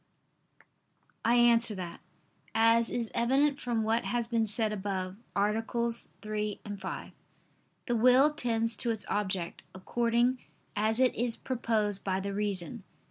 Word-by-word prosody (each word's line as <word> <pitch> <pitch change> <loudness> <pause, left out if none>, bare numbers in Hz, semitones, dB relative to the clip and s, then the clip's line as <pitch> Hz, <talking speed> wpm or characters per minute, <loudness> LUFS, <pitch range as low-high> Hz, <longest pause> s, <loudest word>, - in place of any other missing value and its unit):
I 235 +1 +4
answer 235 -2 +5
that, 180 -3 -6 0.6
As 230 +1 +4
is 235 -2 -3
evident 275 +4 +2
from 235 -3 -1
what 225 +2 +1
has 240 -1 0
been 230 -1 0
said 215 +1 0
above 190 -2 -3 0.2
(AA. 210 +2 +2
3, 220 -3 -3 0.2
5), 190 0 -6 0.7
the 240 - 0
will 255 +6 +5
tends 230 -5 0
to 240 - -1
its 220 -2 -2
object, 190 -4 -1
according 235 +5 +1 0.4
as 220 +2 +1
it 255 -1 +4
is 235 -1 -1
proposed 220 -5 -1
by 190 -1 0
the 200 +1 -3
reason. 205 +1 -2
225 Hz, 135 wpm, -30 LUFS, 205-240 Hz, 0.7 s, answer